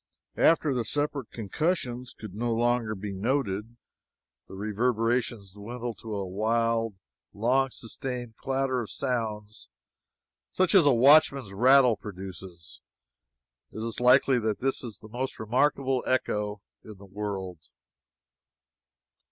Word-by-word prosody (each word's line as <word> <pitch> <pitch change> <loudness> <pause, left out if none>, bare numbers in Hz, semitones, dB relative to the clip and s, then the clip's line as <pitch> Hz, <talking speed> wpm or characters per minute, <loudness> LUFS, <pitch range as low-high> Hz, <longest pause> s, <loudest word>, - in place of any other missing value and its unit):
After 160 -3 +4
the 125 -2 0
separate 145 0 -2
concussions 125 - -2
could 105 -4 -9
no 120 +3 -2
longer 120 -2 +1
be 100 0 -6
noted, 115 0 -2 0.7
the - - -10
reverberations 115 0 -1
dwindled 115 +2 -6
to 110 -2 -6
a 100 -1 -3
wild, 115 +2 0 0.4
long 130 +5 +2
sustained 120 -1 -6
clatter 135 -1 -1
of 110 - -7
sounds 110 - -4 0.8
such 185 +2 +2
as 180 -7 +6
a - - +7
watchman's 135 -3 +5
rattle 125 +1 +5
produces. 95 -3 -10 0.9
It 110 - -5
is 115 - -5
likely 125 +1 +5
that 110 -2 -1
this 135 +1 -1
is 115 -4 -7
the 110 - -11
most 130 +4 -4
remarkable 130 +3 +1
echo 105 -5 -1 0.2
in 110 -2 -11
the 100 - -13
world. 95 -3 -5
115 Hz, 120 wpm, -27 LUFS, 105-130 Hz, 0.9 s, a